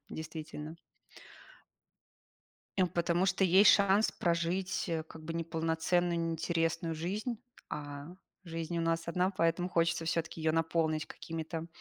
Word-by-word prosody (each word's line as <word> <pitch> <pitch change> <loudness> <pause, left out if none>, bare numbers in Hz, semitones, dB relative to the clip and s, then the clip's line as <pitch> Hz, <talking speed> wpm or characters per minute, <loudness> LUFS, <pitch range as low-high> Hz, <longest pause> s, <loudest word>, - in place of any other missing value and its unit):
действительно. 155 0 -6 2.0
Эм, 185 -2 +4
потому 170 +1 +1
что 190 +1 +2
есть 190 +3 +7
шанс 200 +1 +4
прожить, 175 +2 0
э, 160 -1 -1
как 160 0 -12
бы 165 - -4
неполноценную, 165 +1 0
неинтересную 165 0 0
жизнь. 205 +8 -3 0.3
А, 145 -1 -6 0.4
жизнь 165 -1 -4
у - - +1
нас 165 0 0
одна, 180 +2 +1
поэтому 175 -1 +1
хочется 170 -1 +1
всё-таки 160 0 -2
её 160 0 +2
наполнить 160 -1 +1
какими-то 165 +1 -5
165 Hz, 120 wpm, -32 LUFS, 160-175 Hz, 2.0 s, есть